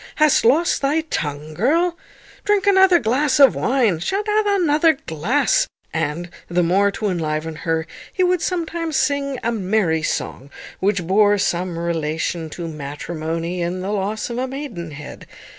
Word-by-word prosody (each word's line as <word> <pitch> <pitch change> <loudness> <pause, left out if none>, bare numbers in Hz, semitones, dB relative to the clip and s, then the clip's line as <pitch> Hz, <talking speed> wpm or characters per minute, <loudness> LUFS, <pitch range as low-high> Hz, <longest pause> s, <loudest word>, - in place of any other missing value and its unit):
Hast 305 -2 +4
lost 305 +9 +3
thy 285 +3 +1
tongue, 150 - -4
girl? 330 - +1 0.5
Drink 415 -1 +2
another 380 -2 +6
glass 270 +2 +1
of 275 -4 +7
wine; 240 -10 +1
sha't 390 - -2
drink 425 0 +1
another 325 -6 +3
glass." 275 - +1 0.3
And, 170 +4 -2 0.2
the 175 +1 +2
more 195 +4 +3
to 210 +2 -3
enliven 160 -2 -2
her, 165 0 -1 0.3
he 370 - 0
would 360 -1 +2
sometimes 330 -3 -2
sing 280 -2 0
a 235 - 0
merry 190 -6 0
song, 140 -3 -3 0.3
which 190 -2 0
bore 205 +3 +4
some 180 -3 -1
relation 165 0 -2
to 170 +2 -6
matrimony 160 +3 -4
and 180 +2 -2
the 195 - -3
loss 210 +3 -2
of 235 - -3
a 260 - -1
maidenhead. 175 - -7
205 Hz, 150 wpm, -20 LUFS, -, 0.5 s, of